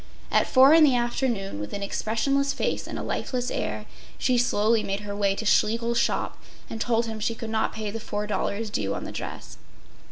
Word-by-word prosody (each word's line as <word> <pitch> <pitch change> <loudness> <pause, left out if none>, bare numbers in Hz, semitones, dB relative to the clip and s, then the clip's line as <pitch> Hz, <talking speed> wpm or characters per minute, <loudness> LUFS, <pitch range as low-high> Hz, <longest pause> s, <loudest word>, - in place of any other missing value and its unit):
At - - +3
four 265 +3 +7
in 325 -1 +7
the 275 -4 +5
afternoon, 240 - -1
with 105 - -6
an 200 - -3
expressionless 275 +8 0
face - - -2
and - - -5
a - - -4
lifeless 250 -1 -2
air 105 0 -3 0.3
she 255 - +1
slowly 225 -2 +3
made 195 0 -3
her 205 -1 -5
way 200 -1 +1
to 220 - -5
Schlegel’s 230 +3 +2
shop - - -1 0.3
and 225 - -5
told 230 -1 +1
him 220 -1 -5
she 230 +2 -1
could 220 0 -6
not 220 0 0
pay 215 -2 -4
the 225 - -5
$4 210 0 -2
due 100 - -1
on - - -5
the - - -6
dress. - - -7
225 Hz, 200 wpm, -26 LUFS, 205-240 Hz, 0.3 s, four